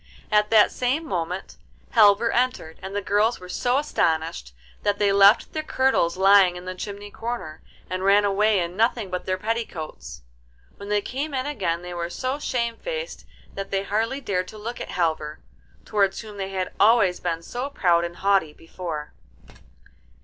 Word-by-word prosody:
At 210 Hz, 0 st, +3 dB
that 220 Hz, -2 st, +5 dB
same 265 Hz, +6 st, -1 dB
moment 180 Hz, -, -4 dB, 0.3 s
Halvor 220 Hz, +1 st, +5 dB
entered, 245 Hz, -10 st, -1 dB
and 190 Hz, +1 st, -7 dB
the 205 Hz, -, -2 dB
girls 210 Hz, +4 st, +2 dB
were 180 Hz, -, -10 dB
so 245 Hz, +7 st, 0 dB
astonished 160 Hz, -, -1 dB, 0.3 s
that 205 Hz, 0 st, 0 dB
they 205 Hz, -1 st, +2 dB
left 200 Hz, +2 st, +5 dB
their 310 Hz, -, -1 dB
kirtles 260 Hz, -, +1 dB
lying 195 Hz, -1 st, +6 dB
in 180 Hz, 0 st, -8 dB
the 185 Hz, -, -4 dB
chimney 205 Hz, +2 st, -7 dB
corner, 225 Hz, -11 st, -5 dB, 0.3 s
and 185 Hz, +1 st, -3 dB
ran 200 Hz, +1 st, +5 dB
away 205 Hz, +1 st, +3 dB
in 175 Hz, 0 st, -3 dB
nothing 225 Hz, -2 st, +1 dB
but 180 Hz, 0 st, -4 dB
their 185 Hz, 0 st, 0 dB
petticoats. 160 Hz, -, -5 dB, 0.5 s
When 200 Hz, -, -9 dB
they 205 Hz, -1 st, +1 dB
came 280 Hz, +3 st, -4 dB
in 260 Hz, 0 st, -1 dB
again 185 Hz, -, -2 dB
they 180 Hz, 0 st, -7 dB
were 170 Hz, 0 st, -3 dB
so 255 Hz, +9 st, -3 dB
shamefaced 295 Hz, -, -3 dB, 0.3 s
that 195 Hz, 0 st, -5 dB
they 195 Hz, 0 st, -1 dB
hardly 225 Hz, +7 st, -1 dB
dared 185 Hz, -7 st, -1 dB
to 215 Hz, -, -10 dB
look 230 Hz, +3 st, -6 dB
at -, -, -6 dB
Halvor, 155 Hz, -3 st, -2 dB, 0.4 s
towards 200 Hz, -2 st, +1 dB
whom 215 Hz, -2 st, -11 dB
they 195 Hz, -1 st, -4 dB
had 190 Hz, -1 st, -3 dB
always 205 Hz, -4 st, +4 dB
been 165 Hz, -2 st, -3 dB
so 245 Hz, +9 st, -4 dB
proud 175 Hz, -10 st, +2 dB
and 170 Hz, 0 st, -5 dB
haughty 195 Hz, -6 st, +1 dB
before. 165 Hz, -2 st, -7 dB
200 Hz, 170 wpm, -24 LUFS, 180-230 Hz, 0.5 s, lying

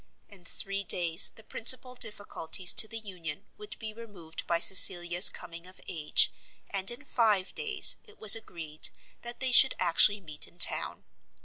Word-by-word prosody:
In 190 Hz, -4 st, -14 dB
three 195 Hz, +3 st, -5 dB
days 170 Hz, -1 st, +1 dB
the 220 Hz, -, -16 dB
principal 250 Hz, +3 st, 0 dB
difficulties 205 Hz, -6 st, 0 dB
to 220 Hz, -, +4 dB
the 225 Hz, -, -7 dB
union 185 Hz, -4 st, -10 dB
would 420 Hz, 0 st, -10 dB
be 220 Hz, -1 st, -9 dB
removed 205 Hz, -8 st, -12 dB
by 170 Hz, -, -1 dB
Cecilia's 175 Hz, 0 st, +5 dB
coming 170 Hz, 0 st, -12 dB
of 185 Hz, -, -16 dB
age, 155 Hz, -4 st, 0 dB, 0.4 s
and 195 Hz, -1 st, -3 dB
in 240 Hz, +4 st, -6 dB
five 215 Hz, -8 st, -2 dB
days 425 Hz, -3 st, 0 dB
it 425 Hz, -, -19 dB
was 215 Hz, -1 st, +4 dB
agreed 165 Hz, -8 st, -5 dB, 0.3 s
that 240 Hz, 0 st, -8 dB
they 260 Hz, -1 st, -3 dB
should 265 Hz, +1 st, +5 dB
actually 185 Hz, +4 st, +3 dB
meet 155 Hz, -6 st, -6 dB
in -, -, -24 dB
town. -, -, -1 dB
195 Hz, 165 wpm, -27 LUFS, 175-225 Hz, 0.4 s, Cecilia's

